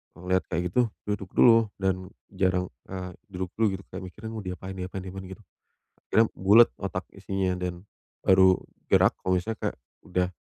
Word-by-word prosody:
ngelihat 90 +1 0
kayak 85 0 -1
gitu, 125 - +4 0.2
duduk 105 -3 -3
dulu 115 -2 +6
dan, 95 -1 -1 0.2
jarang, 95 -2 0 0.2
eee, 90 -1 -5 0.2
duduk 95 -2 -5
dulu 105 -4 +3
gitu, 95 - -10
kayak 95 0 -6
mikirnya 110 +5 -8
"Mau, 110 - -5
diapain 95 0 -6
diapain 95 0 -5
diapain?" 95 0 -7
Gitu. 110 - -21 0.6
Akhirnya, 110 0 +4
bulet 105 +5 +6
otak - - -3
isinya, 95 -1 -2
dan, 90 0 -4 0.4
baru 95 -1 +6 0.3
gerak - - +5
kalau 95 0 +1
misalnya 110 +5 -2
kayak, - - -2 0.3
udah 90 0 +1
95 Hz, 165 wpm, -27 LUFS, 90-100 Hz, 0.6 s, dulu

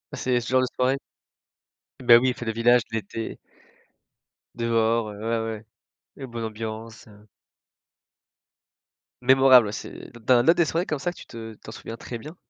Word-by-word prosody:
C'est 125 -1 0
ce 115 - -8
genre 130 0 +3
de 130 - +1
soirée? 130 +2 +1 1.0
Ben, 120 -1 +8
oui, 130 - +1
les - - 0
fêtes 120 - -8
de 110 - -1
village, 120 +1 +4
l'été 110 0 -5 1.2
dehors, 115 -1 +1
heu, 105 - -10
ouais, 115 +1 -1 0.2
ouais, 105 - -16 0.5
une 135 - -7
bonne 115 -1 -5
ambiance, 110 +1 -7
heu 105 0 -18 1.9
Mémorable, 130 -2 +6
ouais, - - -4
c'est - - -8
dans 120 -1 +5
là 165 - +7
des 170 - +2
soirées 170 +4 -1
comme 155 - -3
ça, 175 +6 -2
que - - -17
tu - - -11
te 115 -1 -9
t'en - - -12
souviens 115 - -8
très 120 - -7
bien? 150 +9 -10
115 Hz, 175 wpm, -25 LUFS, 110-130 Hz, 1.9 s, Ben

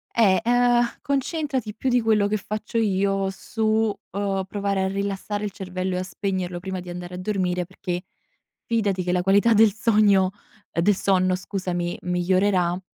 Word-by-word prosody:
Eh, 200 -5 +5
ehm, 245 0 +4 0.2
concentrati 275 -5 -2
più 260 - -1
di 245 -1 +3
quello 215 -2 +3
che 215 +1 0
faccio 215 +3 -5
io 195 -2 +1
su, 220 +3 -5 0.5
uhm, 195 -1 -1
provare 200 -1 -1
a - - +1
rilassare 200 +1 -3
il 205 - -2
cervello 185 -1 -4
e - - -1
a - - -2
spegnerlo 185 -2 -3
prima 190 0 -4
di 180 0 -9
andare 175 0 -7
a - - -6
dormire 185 -2 -1
perché 180 0 -5 0.6
fidati 205 -6 0
che 180 - -1
la 180 0 +2
qualità 200 +5 +4
del 215 -2 +5
sogno 205 -4 +3 0.4
ehm, 170 - 0
del 205 0 +4
sonno 185 -1 +2
scusami, 180 -2 -3
migliorerà, 180 0 +1
195 Hz, 165 wpm, -24 LUFS, 185-215 Hz, 0.6 s, Eh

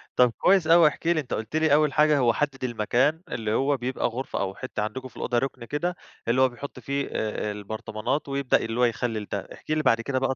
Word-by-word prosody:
طب 125 -2 +5
كويس 190 -4 +4
أوي، 165 -1 +7
احكِ 165 - -3
لي 170 -2 +3
أنت 135 - -5
قُلت 110 +7 -4
لي 155 -2 +3
أول 150 -2 +4
حاجة 150 0 +4
هو 120 -3 +3
حدد 135 0 -2
المكان 125 +7 +1
اللي 110 -2 -2
هو 135 +4 +2
بيبقى 125 +2 -2
غرفة 125 +3 -4
أو 95 -1 -2
حتّة - - -4
عندكم 130 +5 -5
في - - -20
الأوضة 120 - -1
ركن 130 -2 -4
كده، 175 +8 -2 0.3
اللي 125 +3 +3
هو 130 - +5
بيحط 125 +3 -9
فيه 140 0 -2
آآ، 105 -1 -2
البرطمانات 110 +6 -4
ويبدأ 140 -1 +2
اللي 115 +1 -3
هو - - +4
يخلل 115 -2 -2
ده، 100 - -1
احكِ - - -9
لي 155 0 +1
بعد 115 -4 +3
كده 130 +2 -1
بقى 135 0 0
130 Hz, 230 wpm, -26 LUFS, 115-145 Hz, 0.3 s, أوي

